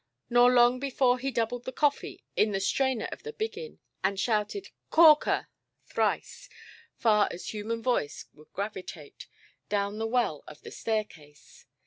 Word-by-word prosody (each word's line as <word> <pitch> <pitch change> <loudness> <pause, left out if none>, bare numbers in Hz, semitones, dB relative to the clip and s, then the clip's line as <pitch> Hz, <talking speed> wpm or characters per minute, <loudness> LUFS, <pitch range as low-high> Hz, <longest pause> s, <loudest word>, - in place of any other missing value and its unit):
Nor 245 +1 +6
long 245 0 +5
before 255 -2 +1
he 270 +2 -2
doubled 240 0 -2
the 260 - -4
coffee 290 +2 -1
in 210 -1 +2
the 195 - 0
strainer 260 +3 0
of - - -8
the 455 - -7
biggin, 450 +1 -5 0.3
and 195 -1 0
shouted 215 - -1 0.2
"Corker"! 315 -2 +5 0.4
thrice, - - -2 0.5
far 210 -3 +3
as 175 - -7
human 225 +2 -4
voice 240 - -1
would 150 +1 -20
gravitate, 190 -7 -7 0.4
down 205 +1 -1
the 225 - -1
well 230 - 0
of 150 - -12
the - - -9
staircase. 190 -10 -5
230 Hz, 145 wpm, -28 LUFS, 205-260 Hz, 0.5 s, Nor